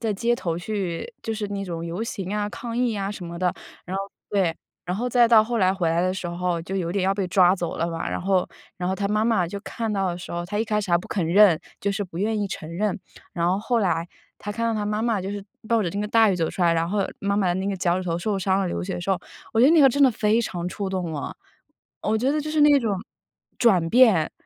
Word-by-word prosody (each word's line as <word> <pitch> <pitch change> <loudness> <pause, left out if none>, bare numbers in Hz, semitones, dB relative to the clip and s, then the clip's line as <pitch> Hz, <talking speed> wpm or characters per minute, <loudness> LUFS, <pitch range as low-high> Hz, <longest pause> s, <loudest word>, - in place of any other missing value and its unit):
在 220 -2 0
街 235 +4 +1
头 170 -8 -3
去 195 - -4
就 225 - -2
是 215 -1 -3
那 200 -1 -3
种 170 -3 -5
游 175 +6 -4
行 195 -5 -4
呀、 210 0 -1
抗 235 +1 -6
议 245 -1 +1
呀 200 -2 -2
什 195 -4 -7
么 170 0 -7
的， 180 -1 +1 0.3
然 185 +2 -4
后 195 - -1 0.3
对， 185 -5 +1 0.3
然 180 +1 -2
后 245 +4 -1
再 240 -1 +4
到 220 -2 +7
后 235 +1 -2
来 185 -2 +4
回 185 -4 0
来 165 +1 +1
的 185 +1 +1
时 185 -1 -4
候， 175 0 -2
就 190 +3 -6
有 175 -3 -1
点 190 +1 0
要 195 +1 +2
被 195 -2 -2
抓 180 0 +5
走 175 -3 -4
了 170 - -1
嘛， 165 -1 -3
然 - - -2
后 185 0 +1 0.3
然 180 0 -2
后 190 - 0
她 200 +1 -2
妈 210 +2 +1
妈 220 -7 +2
就 200 +4 -6
看 225 +1 -4
到 195 -2 0
的 175 - -5
时 175 - -8
候， 170 0 -3
她 205 +4 -3
一 220 - +1
开 210 -1 0
始 200 -3 -5
还 170 - +5
不 - - -9
肯 190 -5 -1
认， 180 -1 +5 0.2
就 200 - 0
是 205 +1 -2
不 175 -3 -8
愿 215 +2 0
意 200 - -1
承 155 - -6
认。 205 0 0 0.3
然 170 -1 0
后 185 - +2
后 235 +3 0
来 170 -5 0 0.3
她 205 - -6
看 230 +2 -2
到 230 - 0
她 210 - -1
妈 210 +1 -1
妈 230 -4 +1
就 190 +1 -4
是 205 -1 -5 0.2
冒 230 +1 +1
着 180 - -1
那 200 - -3
个 210 - -2
大 225 0 +5
雨 - - +1
走 165 -2 0
出 - - -7
来， 170 - +4
然 165 0 0
后 200 +1 0
妈 200 0 0
妈 200 - +2
的 175 - +1
那 190 +2 -2
个 200 - -2
脚 175 -1 +1
趾 - - -6
头 165 0 0
受 200 +3 -1
伤 190 0 +1
了 190 - 0
流 - - -3
血 190 +1 -3
的 - - -4
时 185 +3 -2
候， 190 - +2 0.3
我 225 - +2
觉 255 - +7
得 - - +6
那 330 - +6
个 275 - +8
真 285 +3 +2
的 265 - +7
非 215 +1 +2
常 175 -5 -4
触 200 +1 -4
动 185 -4 -3
我。 145 - -5 0.7
我 220 +1 +1
觉 255 +5 +1
得 305 - 0
就 305 +1 -4
是 305 -1 +1
那 290 -1 +6
种 220 -5 0 0.6
转 185 -8 +3
变， 225 -10 +5
195 Hz, 315 characters per minute, -24 LUFS, 180-220 Hz, 0.7 s, 个